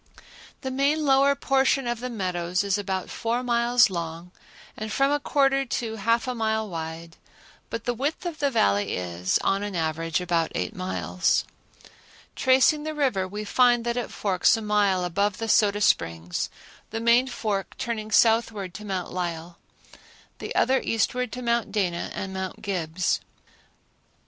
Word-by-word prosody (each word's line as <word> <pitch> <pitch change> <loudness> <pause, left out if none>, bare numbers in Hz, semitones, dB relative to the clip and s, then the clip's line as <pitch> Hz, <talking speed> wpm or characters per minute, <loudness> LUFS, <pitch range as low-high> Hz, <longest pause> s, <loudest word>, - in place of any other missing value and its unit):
The 265 - -4
main 285 +4 +1
lower 275 0 +4
portion 270 -1 +2
of 240 -1 -2
the 250 +1 -4
meadows 180 -4 -1
is 200 -2 +1
about 190 -2 -3
four 235 +2 -2
miles 240 -2 +3
long 170 0 -5 0.4
and 215 0 -5
from 275 +4 +2
a 290 - +2
quarter 275 -1 +2
to 235 -3 -3
half 230 +4 +1
a 255 - -1
mile 220 -2 -1
wide, 165 -1 -7 0.5
but 230 - -4
the 245 - -1
width 285 +9 -3
of 335 -3 -4
the 285 - +2
Valley 100 - +1
is, 90 0 -1
on 195 +1 +1
an 205 -2 -4
average, 165 0 -1
about 170 -2 0
eight 90 - -2
miles. 90 -1 0 0.9
Tracing 265 +4 +4
the 310 0 -4
river, 250 -11 +1
we 205 +3 -5
find 240 +2 +3
that 235 0 0
it 245 -2 -3
forks 195 +2 +2
a - - -5
mile 205 -3 +2
above 195 +3 0
the 225 - -3
Soda 205 -1 +3
Springs, 85 - 0 0.4
the 225 - -4
main 235 +3 +4
fork 210 -6 -3
turning 220 -2 -3
southward 220 -4 +2
to 210 - -8
Mount 190 -3 -4
Lyell, 170 -1 -4 0.8
the - - -6
other 265 0 +3
eastward 250 +2 0
to 250 - -5
Mount 235 -3 0
Dana 180 -5 -1
and 190 -1 -5
Mount 190 -1 -5
Gibbs. 180 -3 -1
210 Hz, 160 wpm, -25 LUFS, 180-245 Hz, 0.9 s, lower